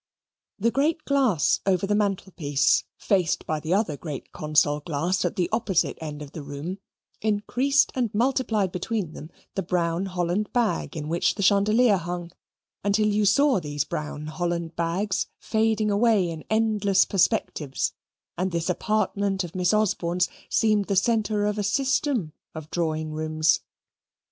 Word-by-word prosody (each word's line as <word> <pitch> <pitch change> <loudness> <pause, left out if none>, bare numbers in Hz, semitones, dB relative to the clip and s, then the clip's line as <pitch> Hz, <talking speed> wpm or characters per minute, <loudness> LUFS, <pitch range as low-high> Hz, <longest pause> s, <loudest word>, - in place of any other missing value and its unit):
The 230 +3 +1
great 305 +5 0
glass 260 - +2
over 190 -1 +1
the 205 - 0
mantelpiece, 190 -8 +1
faced 185 -5 +1
by 155 -1 -1
the 160 +4 0
other 200 -8 0
great 145 -2 -7
console 150 -1 +1
glass 165 +4 -1
at - - -1
the 180 -4 +1
opposite 215 -5 +1
end 150 -2 -6
of 140 - -11
the 155 - -7
room, 145 +7 -6 0.4
increased 245 +6 +2
and 245 -5 -1
multiplied 225 -4 +1
between 180 -2 -3
them 155 - -9 0.2
the 195 - -1
brown 175 0 -1
Holland 180 +3 -1
bag 235 -7 0
in 150 -1 -4
which 170 +2 +1
the 200 - -2
chandelier 205 +3 +4
hung, 175 0 -5 0.5
until 205 +2 +2
you 210 0 +2
saw 275 +3 +4
these 145 -3 -2
brown 150 0 -5
Holland 170 +1 -3
bags 185 +4 -1
fading 220 -1 +1
away 205 -4 +3
in 160 -1 -8
endless 215 -3 +3
perspectives, 165 -6 0 0.5
and 185 +1 0
this 170 +1 0
apartment 200 -1 0
of 175 -1 -8
Miss 180 -2 +1
Osborne's 180 -4 +1 0.2
seemed 215 -3 +2
the 200 - -1
centre 215 0 +1
of 210 0 -1
a - - 0
system 260 - 0 0.2
of 155 -1 -8
drawing 155 -2 -1
rooms. 155 0 +1
190 Hz, 150 wpm, -25 LUFS, 165-215 Hz, 0.5 s, chandelier